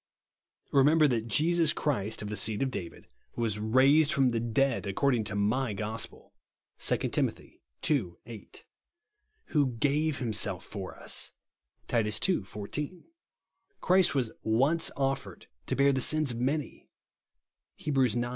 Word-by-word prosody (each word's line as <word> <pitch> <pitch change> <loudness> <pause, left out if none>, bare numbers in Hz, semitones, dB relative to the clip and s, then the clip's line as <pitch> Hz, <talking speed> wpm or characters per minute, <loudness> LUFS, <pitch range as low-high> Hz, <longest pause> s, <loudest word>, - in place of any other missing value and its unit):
Remember 150 +3 +5
that 115 -4 -1
Jesus 160 +6 +3
Christ, 110 -7 -2
of 105 - -5
the 105 - -3
seed 105 +3 0
of 135 - -1
Dsivid, 85 -8 -7 0.3
was 110 -3 -1
raised 135 +8 +4
fro')n 135 -2 +3
the 115 - 0
dead, 120 +1 0
accord 135 +8 +1
ing 115 -3 +1
to 105 -1 -4
my 110 +4 0
gospel," 110 +2 -5 0.5
(2 - - +2
Tim. - - +1 0.6
ii. 115 - 0
8). 115 -2 -11 0.8
"Who 140 -5 +1
gave 145 +5 +1
himself 105 -6 -2
for 95 -3 -7
us," - - -4 0.5
(Titus 105 -3 0
ii. 185 - +2
14). 120 - -6 0.4
" 400 - -46
Christ 185 -4 +3
was 125 -5 0
once 135 +9 +2
offered 135 -1 -2 0.2
to - - -1
bear 140 0 +4
the 130 - +1
sins 155 0 +2
of 115 - -5
many/* 140 +4 -2 0.9
(Heb. 150 - -3
ix. 125 -5 +3
130 Hz, 145 wpm, -29 LUFS, 110-145 Hz, 0.9 s, Remember